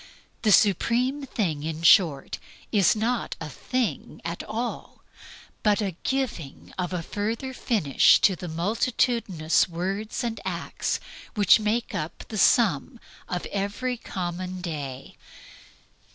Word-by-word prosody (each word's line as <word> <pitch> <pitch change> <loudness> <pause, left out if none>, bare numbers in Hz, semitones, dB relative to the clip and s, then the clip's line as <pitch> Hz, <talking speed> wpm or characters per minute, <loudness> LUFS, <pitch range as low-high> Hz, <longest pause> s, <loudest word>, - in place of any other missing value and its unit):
The 215 - +3
supreme 245 - +3
thing, 170 - -1
in 160 +1 -4
short, 165 -6 +4 0.3
is 200 -3 +4
not 230 +3 -1
a 160 - -5
thing 240 - -3
at 170 +1 -3
all, 230 +3 -5 0.6
but 210 -1 +3
the 195 -5 -2
giving 245 - -3
of 180 -1 -3
a 180 -2 -2
further 225 +8 -3
finish 195 - +4
to 190 - +4
the 180 - -7
multitudinous 195 -1 +1
words 195 +8 -3
and 230 -1 -3
acts - - -2 0.4
which 210 +1 +6
make 215 +2 -1
up 155 +1 -4
the 215 - -3
sum 230 - +3 0.3
of 180 -1 -3
every 205 +6 -2
common 185 -3 -5
day. 145 -7 -6
200 Hz, 125 wpm, -26 LUFS, 170-230 Hz, 0.6 s, which